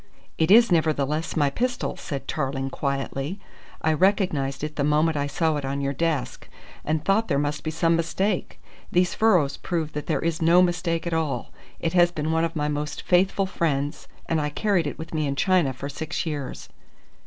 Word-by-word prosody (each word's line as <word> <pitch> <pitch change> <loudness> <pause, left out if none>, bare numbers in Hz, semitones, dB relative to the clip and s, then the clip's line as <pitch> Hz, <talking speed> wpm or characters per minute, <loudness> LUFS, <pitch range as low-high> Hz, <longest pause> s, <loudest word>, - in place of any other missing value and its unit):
"It 160 - +2
is 230 +1 +7
nevertheless 155 -1 +1
my 145 -2 +3
pistol," 245 - -2
said 140 -3 -6
Tarling 135 -2 -2
quietly. 140 +6 -3 0.4
"I 160 - +3
recognised 155 -7 +1
it 150 0 -4
the 140 - 0
moment 150 +2 +2
I 145 -1 0
saw 160 +1 0
it 145 - -4
on 135 +1 -2
your 140 0 -1
desk, 155 -2 -2 0.3
and 155 +1 -1
thought 215 +3 +2
there 140 - +1
must 145 +1 -1
be 155 - -2
some 165 +1 +2
mistake. 185 +4 -1 0.3
These 180 0 +2
furrows 180 -11 +3
prove 165 -4 -3
that 150 -1 -5
there - - +1
is 165 -1 -1
no 170 +3 +6
mistake 175 -2 -1
at 170 - -2
all. 150 -7 -2 0.3
It 165 0 -1
has 175 -1 +5
been 155 -2 -2
one 160 0 +2
of 165 0 -2
my 150 -1 0
most 150 0 -3
faithful 190 +2 +2
friends, 150 -5 -2 0.2
and 160 -2 0
I 150 - -1
carried 180 0 +1
it - - -5
with 160 +2 -8
me 155 -2 0
in 140 - -1
China 180 -3 +2
for 130 +2 -6
six 150 +4 -4
years." 145 -5 -5
160 Hz, 195 wpm, -25 LUFS, 145-175 Hz, 0.4 s, is